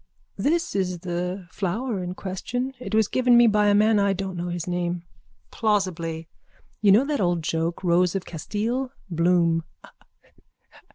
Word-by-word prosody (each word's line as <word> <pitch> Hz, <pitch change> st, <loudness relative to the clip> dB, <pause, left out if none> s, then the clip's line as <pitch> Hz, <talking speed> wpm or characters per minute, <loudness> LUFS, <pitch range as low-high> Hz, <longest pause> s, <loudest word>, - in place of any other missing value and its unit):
_ -, -, -36 dB, 0.4 s
This 335 Hz, -, +1 dB
is 180 Hz, -3 st, -1 dB
the 180 Hz, +1 st, -4 dB
flower 205 Hz, +3 st, -2 dB
in 180 Hz, +1 st, -5 dB
question. 245 Hz, +8 st, -4 dB
It 245 Hz, -3 st, -4 dB
was 220 Hz, -2 st, +4 dB
given 250 Hz, 0 st, +4 dB
me 240 Hz, -, +7 dB
by 210 Hz, -2 st, +3 dB
a 205 Hz, -, +4 dB
man 215 Hz, +1 st, +4 dB
I 200 Hz, -1 st, +2 dB
don't 190 Hz, -1 st, -4 dB
know 175 Hz, 0 st, -3 dB
his 175 Hz, -1 st, -3 dB
name. 175 Hz, -1 st, -2 dB, 0.5 s
(Plausibly.) 175 Hz, -7 st, -1 dB, 0.5 s
You 205 Hz, -2 st, +5 dB
know 225 Hz, +8 st, +5 dB
that 290 Hz, -4 st, -1 dB
old 175 Hz, -3 st, +1 dB
joke, 165 Hz, +3 st, -2 dB
rose 180 Hz, +1 st, +3 dB
of 190 Hz, -, -2 dB
Castile. 225 Hz, +10 st, -3 dB, 0.2 s
Bloom. 170 Hz, -1 st, +2 dB
190 Hz, 160 wpm, -24 LUFS, 175-220 Hz, 0.5 s, me